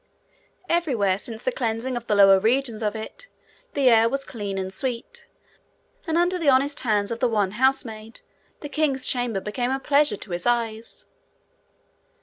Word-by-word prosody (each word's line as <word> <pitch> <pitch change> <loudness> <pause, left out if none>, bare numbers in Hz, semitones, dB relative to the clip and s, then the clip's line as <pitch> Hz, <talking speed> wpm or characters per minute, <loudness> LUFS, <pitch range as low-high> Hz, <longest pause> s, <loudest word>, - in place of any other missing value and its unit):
Everywhere 240 - +1
since 220 0 -7
the 255 - 0
cleansing 240 +1 -2
of 240 -1 -6
the 210 - +2
lower 195 -1 +7
regions 230 +1 0
of 210 0 -1
it, - - -8 0.5
the 280 -2 +2
air 230 -1 +5
was 275 +1 -3
clean 205 -5 -5
and 190 0 -4
sweet, 265 - -5 0.8
and 325 0 0
under 355 +1 +2
the 315 -4 +2
honest 275 +2 +3
hands 210 -3 0
of 230 - -3
the 250 - +2
one 205 -4 0
housemaid 225 -2 -1 0.4
the 295 - -5
king's 285 -3 0
chamber 245 -5 0
became 245 +5 -3
a 265 +1 -1
pleasure 285 -5 +2
to 195 - -11
his 175 +3 -3
eyes. 230 -2 -2
235 Hz, 165 wpm, -24 LUFS, 215-275 Hz, 0.8 s, lower